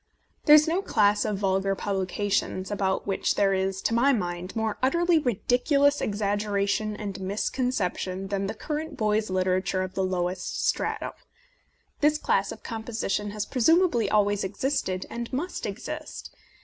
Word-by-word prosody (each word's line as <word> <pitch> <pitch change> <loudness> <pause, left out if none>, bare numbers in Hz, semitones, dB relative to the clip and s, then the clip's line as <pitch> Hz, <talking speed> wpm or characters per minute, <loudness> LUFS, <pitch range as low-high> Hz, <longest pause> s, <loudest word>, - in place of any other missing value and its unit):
There 300 - +9
is 305 +1 +6
no 340 +4 +1
class 205 - +2
of 210 -2 -1
vulgar 195 0 +1
publications 195 0 -1
about 190 -2 0
which 195 - 0
there 195 -1 +3
is, 190 0 -1
to - - +1
my 250 +5 +4
mind, 180 -3 -3
more 220 -1 -1
utterly 340 +5 +3
ridicu 245 +4 +1
lous 285 +1 +4
exaggeration 205 0 0
and 200 -2 -5
misconception 195 -2 -2
than 195 -1 -1
the 215 - -4
current 305 +4 -4
boys' 215 -1 +1
literature 185 0 0
of 185 0 -6
the 190 - -1
lowest 180 0 -2
stratum. - - -1 0.9
This 300 +1 +3
class - - +1
of - - -10
composition 220 -3 -3
has 210 0 -3
presumably 320 - +3
always 205 -1 +2
existed, 190 -2 -2
and 235 0 -5
must 285 0 -3
exist. 205 +4 -7
205 Hz, 150 wpm, -26 LUFS, 195-245 Hz, 0.9 s, There